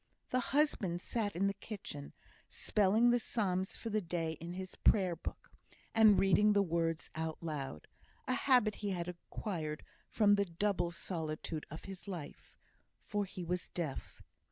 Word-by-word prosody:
The 255 - +3
husband 245 - +1
sat 205 +1 -1
in 190 +3 +2
the 200 - +2
kitchen, 195 -8 -7 0.4
spelling 215 +4 +3
the 245 - +4
psalms 190 -5 -1
for 225 - -5
the 215 0 +1
day 165 -2 -2
in 170 +2 -6
his 185 0 -6
Prayer 185 -5 +3
book, 165 - -7 0.4
and 220 -2 +7
reading 195 +3 +5
the 200 -1 +4
words 165 -2 -1
out 160 0 -3
aloud 145 - -5 0.4
a 255 - +2
habit 250 -5 +3
he 205 - -1
had 175 -3 -2
acquired 170 -3 -4 0.3
from 205 -2 +4
the 200 0 +3
double 175 0 0
solitude 160 -3 -4
of 155 - -8
his 195 0 -8
life, 175 -7 -8 0.5
for 205 -1 -1
he 185 -1 -7
was 175 +1 -2
deaf. 160 -6 -5
185 Hz, 155 wpm, -35 LUFS, 165-210 Hz, 0.5 s, and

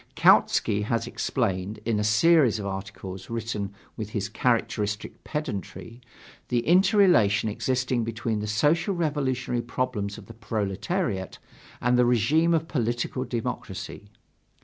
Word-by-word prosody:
Kautsky 105 - +4
has 115 0 0
explained, 95 +3 -2
in 110 -2 +1
a - - 0
series 120 +3 +4
of 105 - -5
articles 95 -1 -6
written 110 -3 -3 0.2
with 110 -2 -5
his 105 0 -3
characteristic 105 -3 -1
pedantry, 115 - -5 0.5
the 120 -1 +1
interrelation 175 - +4
existing 125 +2 -1
between 115 -1 -2
the 105 - -3
Social 155 - +2
Revolutionary 135 -7 -1
problems 120 -4 -3
of 110 - -11
the 115 - -11
proletariat 105 - -2 0.4
and 125 +1 +2
the 125 - +5
regime 150 +9 +3
of 160 0 -1
political 120 -1 -1
democracy. 115 -3 -5
115 Hz, 125 wpm, -26 LUFS, 105-130 Hz, 0.5 s, the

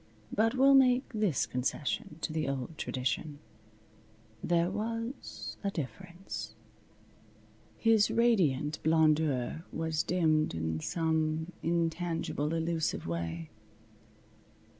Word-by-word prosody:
But 225 +4 +2
we'll 270 +2 +6
make 260 -1 +6
this 210 - +1
concession 150 - -2
to 155 - -2
the 155 -2 -1
old 140 +3 -4
tradition. 145 +2 -2 1.1
There 175 +1 +2
was 230 +4 -4
a 200 - +1
difference. 180 +3 -6 1.2
His 225 -2 +4
radiant 160 - +2
blondeur 155 -3 +2
was 160 -1 -1
dimmed 160 - +2
in 80 -1 -2
some 160 - 0
intangible, 165 -2 -1
elusive 165 -1 -1
way. 85 0 -4
160 Hz, 95 wpm, -31 LUFS, 150-195 Hz, 1.2 s, we'll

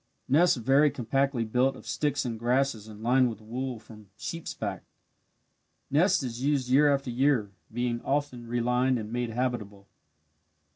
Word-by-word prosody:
Nest 160 +3 +4
very 135 +5 +4
compactly 135 0 0
built 125 +4 +1
of - - -13
sticks 145 -2 -1
and 115 -2 -4
grasses 120 -2 0
and 110 0 -11
lined 125 +1 +4
with 110 -3 -7
wool 125 +3 -4
from 110 -2 -15
sheep's 165 +9 -5
back. - - -4 1.1
Nest 155 +2 +3
is 125 0 -5
used 140 -3 +1
year 145 +3 +5
after 135 -2 -1
year, 125 -5 +1 0.2
being 120 0 -2
often 135 -4 -2
relined 125 +2 +1
and 110 0 -6
made 120 -1 -1
habitable. 110 -5 -3
125 Hz, 150 wpm, -28 LUFS, 115-135 Hz, 1.1 s, year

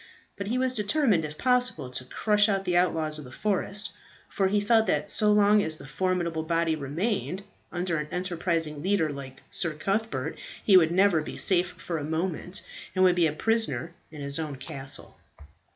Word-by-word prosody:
But 200 -1 -5
he 240 +4 0
was 260 0 +2
determined 210 - +2
if 150 0 -8
possible 250 - +1
to 125 0 -5
crush 210 - +2
out 195 -1 0
the 180 - 0
outlaws 160 -4 +1
of - - -8
the 125 - -12
forest, 205 +4 -2 0.4
for 195 - +1
he 205 +2 +2
felt 220 +1 +3
that 150 -4 +1
so 210 -1 +5
long 210 0 +5
as 160 -4 -2
this 135 -2 -11
formidable 175 -1 -1
body 165 0 +1
remained 165 - -2 0.3
under 175 -1 -1
an 150 0 -3
enterprising 170 -4 -1
leader 185 -4 +1
like 135 -2 -9
Sir 165 -3 -1
Cuthbert, 195 -5 -2 0.3
he 200 - +6
would 165 -3 +6
never 185 -2 +4
be - - -7
safe 180 -1 +2
for 165 -2 -4
a - - -5
moment, 170 +4 -2 0.3
and 185 - +3
would 180 -1 +5
be 170 -2 +4
a - - -1
prisoner 170 - 0 0.2
in 150 -2 -10
his 140 +2 0
own 155 -3 -4
castle. 135 0 -7
175 Hz, 185 wpm, -27 LUFS, 155-200 Hz, 0.4 s, he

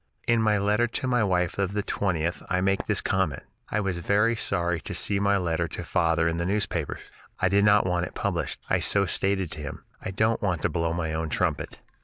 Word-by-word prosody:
In 120 -1 +3
my 105 -1 +3
letter 105 +4 +2
to 120 - -3
my 125 -3 +2
wife 90 -2 0
of 100 0 0
the 105 0 -1
20th 85 -5 -1
I 90 - +1
make 95 +1 0
this - - +2
comment: 95 -7 0 0.3
"I 110 - 0
was 95 -4 -1
very 105 +6 +2
sorry 85 -6 -1
to - - -6
see 100 - +1
my 100 0 +3
letter 85 -2 0
to - - -6
father 80 0 +1
in 85 0 0
the 85 - -1
newspapers. 100 +1 -1 0.4
I 95 - +2
did 100 +1 +4
not 105 -1 +5
want 90 -1 0
it - - -13
published. - - -2
I - - +2
so 100 -1 +2
stated 95 -1 0
to 80 - -4
him. 70 -2 -7 0.2
I - - -4
don't 110 +4 +1
want 90 -7 -1
to - - +2
blow 85 -1 -1
my 80 -1 -2
own 80 0 -2
trumpet. - - -1
95 Hz, 225 wpm, -26 LUFS, 85-100 Hz, 0.4 s, not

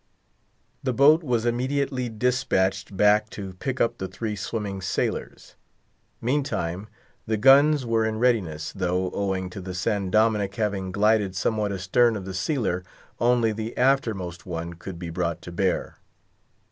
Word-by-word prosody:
The 130 -2 -1
boat 150 +6 +6
was 120 -6 0
immediately 130 +1 -1
dispatched 105 -5 0
back 105 +1 +4
to 95 -4 -7
pick 130 -1 -3
up 115 - +1
the 95 - -3
three 105 +3 -4
swimming 100 -1 -4
sailors. 90 - -3 0.7
Meantime, 110 - -1 0.4
the 110 0 0
guns 140 +4 +6
were 115 -1 +1
in 110 0 -1
readiness, 95 -11 0
though, 90 -1 -1
owing 95 -2 -2
to 95 - -7
the 90 0 -6
San 95 +1 -1
Dominick 105 -1 +2
having 100 -4 -2
glided 105 -1 +2
somewhat 105 +1 0
astern 100 +5 +2
of 100 -3 -5
the 95 - -6
sealer, 95 - -1 0.4
only 120 -1 +3
the 110 +2 -5
aftermost 115 -10 +1
one 85 -1 -5
could 85 +1 -8
be 85 -1 -6
brought 85 -1 -2
to 90 - -8
bear. 90 +1 -1
105 Hz, 145 wpm, -25 LUFS, 95-120 Hz, 0.7 s, boat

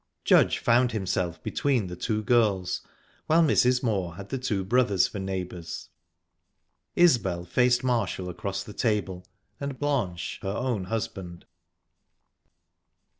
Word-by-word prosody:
Judge - - +5
found 120 0 +3
himself 95 -4 -2
between 130 -7 0
the 90 -1 -6
two 110 +3 -2
girls, 105 -6 +2 0.5
while 165 +2 +5
Mrs. 125 -4 +3
Moor 95 -8 -1
had 100 +1 -9
the 135 - -3
two 105 -7 -1
brothers 105 -3 +3
for 100 - -7
neighbors; 90 -3 -5 1.1
Isbel 115 - +3
faced 125 +7 +2
Marshall 120 -7 0
across 95 +2 -4
the 105 - -10
table, 100 -6 -1 0.4
and 140 -2 -4
Blanche 120 -13 -2
her 95 - -3
own 110 -2 -2
husband. 95 -5 -5
105 Hz, 125 wpm, -27 LUFS, 95-125 Hz, 1.1 s, Judge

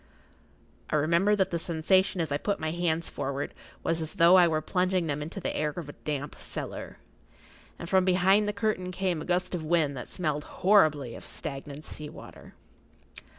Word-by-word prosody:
I - - 0
remember 170 +7 +3
that 190 -2 +1
the 170 - -1
sensation 180 +4 +2
as 160 -3 -3
I 145 - 0
put 200 +3 -1
my 155 0 -2
hands 170 -1 0
forward 140 0 -3 0.3
was 165 0 0
as 160 -1 -5
though 170 +2 +7
I 180 -2 +7
were 155 -2 +1
plunging 180 +2 0
them 150 -2 -2
into 160 +6 -5
the - - -3
air 150 0 0
of 155 +1 -7
a 145 - -8
damp 145 -1 -5
cellar, - - -6 0.8
and 170 - -7
from 190 +1 +4
behind 190 +3 +4
the - - +1
curtain 200 -3 -1
came 180 -3 -1
a - - -6
gust 180 +1 0
of 175 -3 -2
wind 155 -3 +1
that 125 - -7
smelled 150 -4 -2 0.2
horribly 155 - +4
of - - -9
stagnant 140 +1 -6
sea 150 -1 -5
water. - - -13
165 Hz, 190 wpm, -28 LUFS, 150-185 Hz, 0.8 s, though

